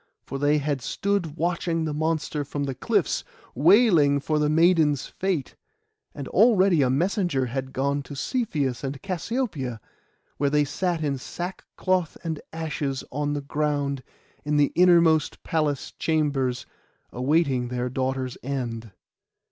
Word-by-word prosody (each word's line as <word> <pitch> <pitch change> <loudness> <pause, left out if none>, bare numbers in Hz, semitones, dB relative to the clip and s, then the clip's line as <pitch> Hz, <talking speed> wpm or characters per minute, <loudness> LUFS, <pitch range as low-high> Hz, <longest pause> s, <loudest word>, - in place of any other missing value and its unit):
For 135 - -5
they 145 +2 +3
had 145 -2 -1
stood 175 - -1
watching 170 -1 0
the 155 - -2
monster 155 -1 -1
from 145 0 -4
the 135 -1 -2
cliffs, 130 - 0 0.3
wailing 160 - +5
for 150 +2 0
the 150 0 +2
maiden's 160 -3 +3
fate. 185 -8 -2 0.6
And 140 -2 -6
already 195 -6 +4
a 130 - +3
messenger 170 - +1
had 130 +2 -4
gone 140 +2 0
to 145 - -8
Cepheus 145 - -1
and 135 0 -4
Cassiopoeia, 185 - -3 0.6
where 140 0 +1
they 150 0 +3
sat 170 +3 -1
in 140 -3 -1
sackcloth 180 +2 -3
and 160 -3 -3
ashes 150 -4 -3
on 145 +2 -1
the 145 - -2
ground, 145 -1 -1 0.4
in 150 0 0
the 145 -1 +3
innermost 170 -3 +4
palace 150 -4 -1
chambers, 140 -6 0 0.5
awaiting 130 -1 +1
their 125 0 -2
daughter's 130 0 -2
end. 120 -5 -4
150 Hz, 135 wpm, -25 LUFS, 135-165 Hz, 0.6 s, wailing